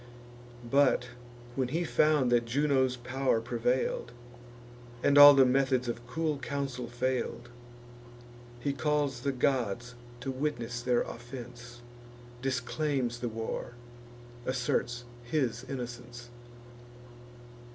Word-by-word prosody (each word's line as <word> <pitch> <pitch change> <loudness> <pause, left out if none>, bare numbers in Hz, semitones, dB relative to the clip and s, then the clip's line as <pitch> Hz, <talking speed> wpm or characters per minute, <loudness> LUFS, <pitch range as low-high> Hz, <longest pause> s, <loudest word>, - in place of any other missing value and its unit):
But, 130 -1 +3 0.5
when 130 -2 0
he 165 +7 -1
found 150 -6 +3
that 120 -1 +3
Juno's 130 0 +2
pow'r 130 0 0
prevail'd, 120 +2 -1 0.9
And 145 - +4
all 145 0 +11
the 135 -1 +7
methods 130 -1 +2
of 120 0 -5
cool 155 +1 -1
counsel 135 -2 -3
fail'd, 120 0 -2 1.1
He 140 +3 -1
calls 145 -2 0
the 140 +3 -1
gods 125 -3 0 0.3
to 135 +1 -3
witness 130 -4 -3
their 120 0 +2
offence, 120 0 -9 0.6
Disclaims 130 -1 -1
the 120 - -2
war, 115 +2 -5 0.7
asserts 125 -1 -1 0.2
his 125 -2 -1
innocence. 120 -2 -7
125 Hz, 100 wpm, -30 LUFS, 120-140 Hz, 1.1 s, all